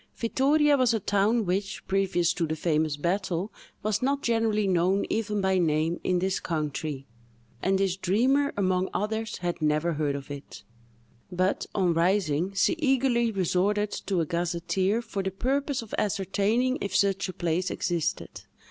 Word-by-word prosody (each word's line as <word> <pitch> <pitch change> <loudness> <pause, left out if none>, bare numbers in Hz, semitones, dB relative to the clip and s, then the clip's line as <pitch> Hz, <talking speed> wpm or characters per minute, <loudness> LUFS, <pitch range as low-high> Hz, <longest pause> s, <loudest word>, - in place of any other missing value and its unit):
Vittoria 285 +5 +3
was 250 -3 +3
a - - 0
town 205 +3 +1
which, 195 +2 -2
previous 190 -3 +1
to 170 -3 -1
the 155 - -2
famous 155 -2 0
battle, 180 +3 -1 0.3
was 215 -1 0
not 280 +2 0
generally 225 -2 +1
known 185 +1 +2
even 210 -2 -1
by 190 -1 +2
name 160 0 +1
in 180 - +1
this 190 +1 0
country, 150 -3 -3 0.6
and 190 +1 +2
this 190 -1 0
dreamer, 255 +10 +2
among 185 -1 +1
others, 220 +1 -2
had 175 -1 -3
never 155 +2 +1
heard 145 -2 -1
of 140 0 -7
it; 140 0 -9 0.7
but, 185 +2 0
on 185 -4 +2
rising, 170 -1 +1
she 195 - +3
eagerly 260 -5 +2
resorted 200 +2 +1
to 190 -4 -1
a - - 0
gazetteer 175 +6 -1
for 200 -3 -4
the 190 - -1
purpose 270 +6 -1
of 220 - -13
ascertaining 210 +6 0
if 200 -2 -3
such 195 -1 +2
a - - -5
place 175 +1 -1
existed. 170 -4 -2
190 Hz, 155 wpm, -27 LUFS, 175-215 Hz, 0.7 s, Vittoria